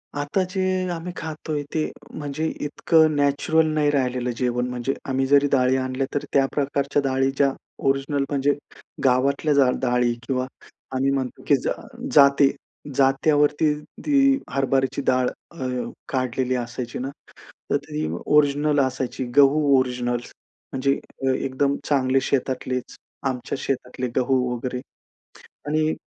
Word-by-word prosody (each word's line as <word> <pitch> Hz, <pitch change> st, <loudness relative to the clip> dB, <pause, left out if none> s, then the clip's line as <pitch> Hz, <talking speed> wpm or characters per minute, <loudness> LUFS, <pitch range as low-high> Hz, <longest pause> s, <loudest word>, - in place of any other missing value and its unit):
आता 145 Hz, +6 st, 0 dB
जे 190 Hz, -, -1 dB, 0.3 s
आम्ही 170 Hz, +1 st, -4 dB
खातोय 155 Hz, -2 st, -4 dB
ते 155 Hz, -, +1 dB, 0.3 s
म्हणजे 150 Hz, +1 st, -3 dB, 0.2 s
इतकं 155 Hz, +1 st, +3 dB
नॅचरल 145 Hz, +3 st, +2 dB
नाही 150 Hz, -1 st, +2 dB
राहिलेलं 125 Hz, -3 st, 0 dB
जेवण. 125 Hz, -1 st, 0 dB
म्हणजे 125 Hz, +2 st, -2 dB, 0.2 s
आम्ही 135 Hz, 0 st, +1 dB
जरी 140 Hz, +1 st, +5 dB
डाळी 130 Hz, -1 st, +3 dB
आणल्या, 130 Hz, +1 st, -1 dB
तर 145 Hz, -, -1 dB
त्या 135 Hz, -1 st, +5 dB
प्रकारच्या 140 Hz, 0 st, 0 dB
डाळी 135 Hz, 0 st, +2 dB
ज्या 140 Hz, -1 st, +4 dB, 0.4 s
ओरिजिनल, 140 Hz, +1 st, +1 dB
म्हणजे 145 Hz, 0 st, +2 dB, 0.5 s
गावातल्या 140 Hz, +4 st, +2 dB
जा 140 Hz, -2 st, +5 dB
डाळी 125 Hz, -1 st, +2 dB
किंवा 130 Hz, -1 st, 0 dB, 0.5 s
आम्ही 135 Hz, +1 st, +2 dB
म्हणतो 130 Hz, -2 st, -3 dB
की 145 Hz, -, +6 dB
ज -, -, -1 dB
अ, -, -, -3 dB, 0.3 s
जाते 140 Hz, 0 st, +6 dB, 0.4 s
जात्यावरती 145 Hz, +2 st, +3 dB, 0.3 s
ती 275 Hz, -2 st, +4 dB
हरभराची 135 Hz, 0 st, 0 dB
डाळ 130 Hz, -1 st, +3 dB, 0.2 s
अ, 135 Hz, -6 st, -6 dB, 0.4 s
काढलेली 130 Hz, -1 st, 0 dB
असायची 120 Hz, 0 st, -4 dB
ना, 130 Hz, +2 st, -3 dB, 0.6 s
तर -, -, +3 dB
ती 75 Hz, +1 st, -3 dB, 0.2 s
ओरिजिनल 145 Hz, 0 st, +3 dB
असायची, 130 Hz, -1 st, -1 dB
गहू 145 Hz, +1 st, +6 dB, 0.2 s
ओरिजिनल 125 Hz, -1 st, 0 dB, 0.6 s
म्हणजे 140 Hz, +1 st, +1 dB, 0.3 s
अ, -, -, +3 dB
एकदम 140 Hz, +2 st, 0 dB
चांगले 135 Hz, -2 st, +2 dB
शेतातलेच. 130 Hz, -1 st, -2 dB, 0.3 s
आमच्या 130 Hz, 0 st, -2 dB
शेतातले 125 Hz, -1 st, -3 dB
गहू 130 Hz, +1 st, +2 dB, 0.2 s
वगैरे 125 Hz, +1 st, -4 dB, 0.9 s
आणि 155 Hz, +1 st, +1 dB
135 Hz, 130 wpm, -23 LUFS, 130-145 Hz, 0.9 s, की